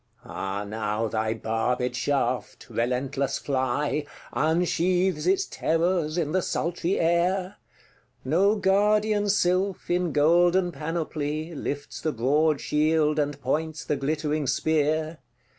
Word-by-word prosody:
—Ah 95 Hz, +1 st, -4 dB
now 105 Hz, +1 st, -2 dB
thy 110 Hz, 0 st, -1 dB
barbed 115 Hz, +3 st, -1 dB
shaft, 130 Hz, -3 st, -1 dB
relentless 130 Hz, +3 st, -1 dB
fly, 140 Hz, +2 st, -1 dB, 0.3 s
Unsheaths 175 Hz, +2 st, +1 dB
its 190 Hz, +1 st, +3 dB
terrors 165 Hz, -1 st, 0 dB
in 155 Hz, -4 st, 0 dB
the 185 Hz, +2 st, +2 dB
sultry 175 Hz, +2 st, -1 dB
air! 180 Hz, +3 st, +1 dB, 0.7 s
No 190 Hz, +10 st, +3 dB
guardian 205 Hz, +1 st, +2 dB
sylph, 185 Hz, -1 st, +1 dB
in 175 Hz, -1 st, +1 dB
golden 175 Hz, +4 st, +3 dB
panoply, 155 Hz, 0 st, -3 dB
Lifts 145 Hz, -1 st, -5 dB
the 155 Hz, -, 0 dB
broad 145 Hz, +5 st, +2 dB
shield, 155 Hz, 0 st, +1 dB
and 145 Hz, -1 st, -1 dB
points 155 Hz, +4 st, -2 dB
the 150 Hz, -, 0 dB
glittering 150 Hz, +1 st, -1 dB
spear. 155 Hz, +3 st, 0 dB
155 Hz, 110 wpm, -26 LUFS, 140-175 Hz, 0.7 s, its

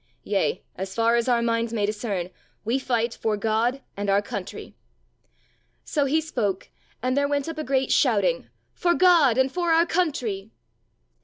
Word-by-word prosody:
Yea, 195 Hz, -2 st, 0 dB
as 190 Hz, +1 st, -5 dB
far 230 Hz, +1 st, +3 dB
as 235 Hz, 0 st, +1 dB
our 235 Hz, -1 st, +2 dB
minds 230 Hz, 0 st, 0 dB
may 215 Hz, -3 st, 0 dB
discern, 205 Hz, -4 st, -3 dB, 0.3 s
we 240 Hz, +5 st, +1 dB
fight 235 Hz, -3 st, 0 dB
for 220 Hz, -2 st, -1 dB
God 225 Hz, +5 st, 0 dB
and 205 Hz, 0 st, -3 dB
our 195 Hz, 0 st, +4 dB
country." 205 Hz, -, -7 dB, 1.1 s
So 290 Hz, -3 st, 0 dB
he 295 Hz, +4 st, +2 dB
spoke, 230 Hz, -, -3 dB, 0.3 s
and 255 Hz, 0 st, +1 dB
there 285 Hz, 0 st, +2 dB
went 285 Hz, 0 st, -1 dB
up 325 Hz, -1 st, -5 dB
a -, -, -2 dB
great 265 Hz, 0 st, 0 dB
shouting, -, -, +2 dB, 0.2 s
"For 345 Hz, -1 st, +1 dB
God 335 Hz, -10 st, +5 dB
and 260 Hz, 0 st, +2 dB
for 345 Hz, 0 st, 0 dB
our 330 Hz, +1 st, +5 dB
country." 255 Hz, -, -1 dB
240 Hz, 165 wpm, -25 LUFS, 215-290 Hz, 1.1 s, God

